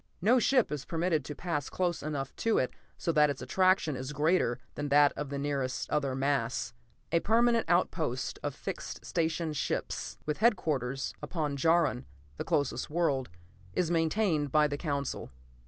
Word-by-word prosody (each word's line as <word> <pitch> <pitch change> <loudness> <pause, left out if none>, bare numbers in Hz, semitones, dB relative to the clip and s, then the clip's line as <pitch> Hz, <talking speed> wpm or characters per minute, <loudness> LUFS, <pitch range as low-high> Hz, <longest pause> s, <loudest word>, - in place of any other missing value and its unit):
No 230 +8 +4
ship 250 - +3
is 145 -2 -3
permitted 165 -2 0
to 150 - -6
pass 160 -5 -3
close 175 -2 -1
enough 145 -3 -4
to 225 -1 +2
it 130 - 0 0.2
so 165 - 0
that 150 -2 +4
its 140 - -3
attraction 185 -5 +2
is 130 +3 -5
greater 150 -4 +2 0.2
than 145 0 -4
that 145 0 +5
of 145 -1 -4
the 140 - -3
nearest 140 -2 -2
other 140 -3 0
mass. 135 -3 0 0.4
A 170 - +4
permanent 230 +4 +3
outpost - - 0
of - - -3
fixed - - -6
station 165 -1 -1
ships, 150 - -3
with 150 -1 -1
headquarters 150 - +1
upon 150 -5 -2
Jaron, 160 -3 +2 0.3
the - - -3
closest 145 -2 0
world, 150 - 0 0.5
is 175 -2 +1
maintained 165 -3 +1
by 150 +1 +5
the 145 - -3
Council. 145 -2 -3
150 Hz, 160 wpm, -30 LUFS, 140-175 Hz, 0.5 s, that